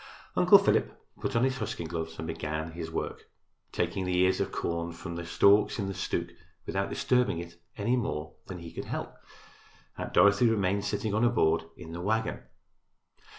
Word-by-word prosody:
Uncle - - +8
Philip - - +1 0.2
put - - -2
on 115 - +3
his 130 0 +1
husking 110 -6 -3
gloves 80 -1 -4
and 80 - -5
began 80 +1 -3
his 80 0 -6
work, - - -5 0.4
taking 95 - -1
the 90 -1 0
ears 95 +1 +3
of - - -1
corn 85 0 -2
from 85 0 -7
the 85 - -4
stalks 100 +4 +4
in 100 - -1
the 95 - -3
stook 85 -2 -2 0.4
without 95 0 -1
disturbing 125 -8 +1
it 85 0 -8 0.2
any 115 +4 +1
more 75 -10 -3
than 95 - -6
he 85 -1 -9
could - - -5
help. - - -4 0.9
Aunt - - -4
Dorothy 100 +4 +5
remained 100 -2 +1
sitting 105 +1 -1
on 110 - +2
her 120 - +5
board 80 -8 +2
in 85 -2 -9
the 85 +1 -5
wagon. 110 +4 0
90 Hz, 185 wpm, -29 LUFS, 85-105 Hz, 0.9 s, Uncle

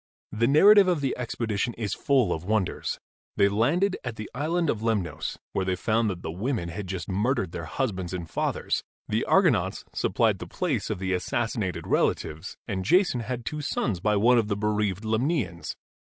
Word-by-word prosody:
The 115 +2 +1
narrative 195 +7 +7
of 175 -5 +1
the 135 -2 0
expedition 115 -2 -2
is 110 -3 -2
full 130 -9 +2
of 80 - -5
wonders. 105 -1 -1 0.4
They 100 - +5
landed 150 - +2
at 125 -3 -4
the 110 -1 -7
Island 165 +6 0
of 110 -6 0
Lemnos, 95 -9 -1 0.2
where 95 - 0
they 95 0 0
found 110 +4 +1
that 90 -3 -5
the 80 - -3
women 100 0 -2
had 95 +3 -5
just 90 -3 -4
murdered 100 -1 0
their 85 - -5
husbands 95 - -2
and 90 -3 -4
fathers. - - -1 0.2
The - - 0
Argonauts - - +2
supplied - - +1
the - - -7
place - - -2
of - - -1
the 95 0 -2
assassinated 105 0 -2
relatives, 80 +4 -1
and 95 -4 -2
Jason 175 - +3
had 120 +1 -4
two 150 +6 -3
sons 115 -8 -1
by 105 +4 +1
one 120 +4 +5
of 110 - 0
the 100 -1 -1
bereaved 105 -1 0
Lemnians. 110 - -1
110 Hz, 180 wpm, -26 LUFS, 95-125 Hz, 0.4 s, narrative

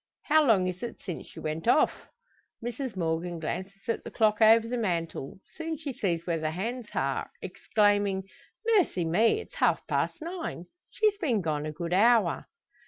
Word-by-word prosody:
"How 310 +1 +4
long 215 -9 +4
is 180 0 -3
it 240 - -6
since 180 - -6
she - - -11
went 155 +5 -4
off?" 250 - +3 0.6
Mrs 245 -1 -4
Morgan 170 0 -1
glances 190 +5 -5
at 230 - -1
the - - -7
clock 215 -1 +2
over 225 +1 +7
the 245 - -2
mantel; 170 - -2 0.2
soon 325 -1 -4
she 285 -2 -5
sees 170 -7 -1
where 170 -2 0
the 155 0 -1
hands 225 +8 -4
are, 135 0 -1
exclaiming: 205 0 +1 0.4
"Mercy 385 - +2
me! 215 - +3
It's - - -14
half - - +2
past - - -1
nine! 330 - -5 0.2
She's 425 -2 +1
been 250 - +1
gone 155 -3 -2
a - - -3
good 170 +3 -4
hour!" 225 +3 +4
205 Hz, 170 wpm, -28 LUFS, 170-245 Hz, 0.6 s, over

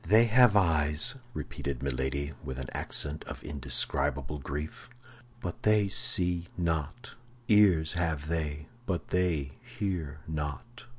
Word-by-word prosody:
"They 110 +7 +6
have 120 -1 +5
eyes," 75 - +3 0.2
repeated 70 - -5
Milady, 70 +2 -2
with 65 -1 -5
an 65 -1 -5
accent 75 +1 -1
of - - -8
indescribable 70 0 -2
grief, 75 - -6 0.5
"but 90 - -5
they 105 -2 +3
see 90 -3 +4
not; 85 - -2 0.3
ears 95 -7 +5
have 80 -4 -1
they, 75 -2 -2 0.2
but 90 -3 -2
they 80 -7 0
hear 85 -8 -4
not." 80 - -5
80 Hz, 120 wpm, -30 LUFS, 70-90 Hz, 0.5 s, They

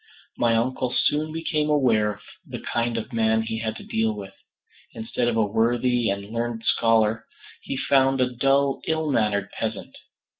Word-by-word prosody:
My 115 -1 +2
uncle 125 +2 0
soon 155 +1 +1
became 155 -2 -1
aware 115 -8 +3
of 105 - -19 0.2
the - - -7
kind 120 0 -2
of 115 +3 -5
man 110 -1 +2
he 110 0 -4
had 110 -1 -3
to - - -10
deal 110 -1 0
with. 100 -2 -8 0.6
Instead 115 +2 -2
of 115 -1 0
a 110 - +3
worthy 120 +2 +1
and 100 0 -2
learned 115 0 -3
scholar, 115 -1 +2 0.3
he 135 - -5
found 135 0 +3
a 125 -1 +1
dull 135 +2 +2
ill 160 -1 0
mannered 105 -5 0
peasant. - - -5
115 Hz, 165 wpm, -24 LUFS, 110-135 Hz, 0.6 s, aware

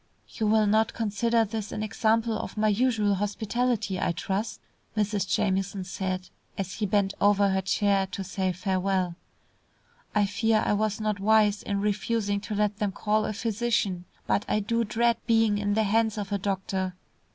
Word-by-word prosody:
"You 220 - -2
will 215 0 +4
not 220 +2 +2
consider 230 +1 +1
this 215 -1 -5
an 215 - -3
example 225 +1 +1
of - - -6
my 215 0 +3
usual 215 -2 +2
hospitality, 210 0 -1
I 175 - 0
trust," 195 +6 -3 0.4
Mrs. 205 -2 0
Jamieson 195 0 0
said, 185 0 -3 0.3
as 190 -1 -3
he 210 - -2
bent 200 -1 +1
over 205 0 +4
her 190 0 +1
chair 195 0 +1
to 190 +1 -5
say 190 0 -1
farewell. 185 -1 0 1.0
"I 210 -1 +4
fear 220 +2 +1
I - - +2
was 215 +1 0
not 215 -1 -1
wise 210 0 +3
in 200 -1 -2
refusing 205 0 0
to 210 - -5
let 210 0 0
them 210 -3 0
call 215 +2 0
a - - -2
physician, 220 -4 -1 0.2
but 205 - +1
I 210 - +1
do 230 +3 0
dread 235 +2 +1
being 225 -3 +3
in 205 0 0
the 220 - +3
hands 220 +1 +1
of 205 -1 -4
a 200 - 0
doctor. 190 -1 -2
205 Hz, 175 wpm, -27 LUFS, 195-220 Hz, 1.0 s, will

